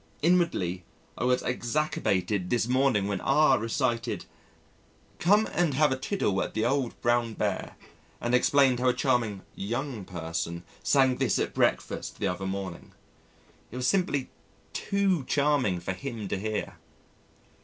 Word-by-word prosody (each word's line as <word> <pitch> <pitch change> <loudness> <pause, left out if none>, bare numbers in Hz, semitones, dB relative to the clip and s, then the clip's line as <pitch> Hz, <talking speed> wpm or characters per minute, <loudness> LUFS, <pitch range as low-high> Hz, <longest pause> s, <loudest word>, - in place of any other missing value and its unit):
Inwardly 150 - +2 0.3
I - - -2
was 125 0 +2
exacerbated 105 - -1
this 120 -1 +1
morning 130 -5 +2
when 100 -2 -2
R 135 -1 +4
recited, 115 +1 -1 0.9
"Come 205 +5 +4
and 170 -6 +1
have 150 0 +4
a - - +2
tiddle 130 - -1
at - - -4
the 110 - +1
old 135 -3 0
Brown 120 -2 +1
Bear," - - -2 0.4
and 120 - -2
explained 130 0 +4
how 130 0 +3
a 125 - +1
charming 115 -7 0
"young 120 +2 -3
person" 85 0 -4 0.2
sang 135 -3 +3
this - - +1
at - - -1
breakfast - - 0
the - - -1
other 90 +2 -3
morning. 95 -2 -5 0.8
It - - -11
was 125 0 -2
simply 145 -3 +1 0.4
too 195 -6 +1
charming 140 -11 +2
for 95 - -3
him 115 -1 -6
to 100 - -1
hear. 110 +1 -3
125 Hz, 145 wpm, -28 LUFS, 100-140 Hz, 0.9 s, R